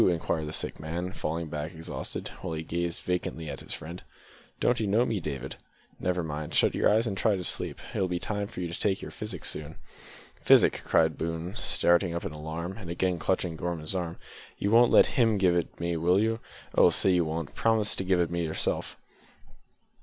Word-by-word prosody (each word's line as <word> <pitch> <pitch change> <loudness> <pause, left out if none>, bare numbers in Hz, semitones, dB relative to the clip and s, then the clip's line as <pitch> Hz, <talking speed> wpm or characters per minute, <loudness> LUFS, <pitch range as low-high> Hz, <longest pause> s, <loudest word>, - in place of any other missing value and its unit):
inquired 80 -2 -1
the - - -4
sick - - -2
man, 85 +4 -3
falling 80 -1 -3
back 75 +2 -5
exhausted, 80 +1 -4
while 85 -3 -3
he 80 - -4
gazed 85 +1 -2
vacantly 90 -3 -2
at 70 -2 -5
his - - -9
friend. 85 +4 -6 0.6
"Don't 120 - +2
you 110 - 0
know 110 +5 +3
me, 110 -5 -1
David?" 65 -5 -5 0.4
"Never 90 -1 0
mind, 75 -1 -4
shut - - +4
your - - +3
eyes 110 +3 +3
now 110 - -1
and 95 - -4
try 105 +2 +3
to 90 - -4
sleep. - - -2
It'll 95 - +1
be 90 -1 -1
time 105 +2 -2
to 90 -5 -5
take 95 +2 0
your - - -7
physic 105 -6 -6
soon." 75 +1 -4 0.7
"Physic!" - - +5
cried 80 -1 +2
Boone, 85 +2 -3
starting 85 -5 +2
up 85 - -3
in - - -3
alarm, 80 +5 -5
and 90 -6 -8
again 90 0 0
clutching 90 0 0
Gorman's 85 -1 -3
arm. 85 -3 -3 0.4
"You 100 - 0
won't 120 +1 +6
let - - +8
him 115 -4 +2
give 90 -3 +3
it 85 -2 -2
me, 85 0 -1
will 90 +4 +3
you? 115 +1 +1 0.3
Oh! - - +6
say 95 - +3
you 90 -1 +3
won't 80 -1 -4
promise 110 -2 +3
to - - +1
give 95 -1 +2
it 85 -1 +1
me 85 0 -1
yourself!" 80 -1 -2
85 Hz, 205 wpm, -28 LUFS, 80-95 Hz, 0.7 s, let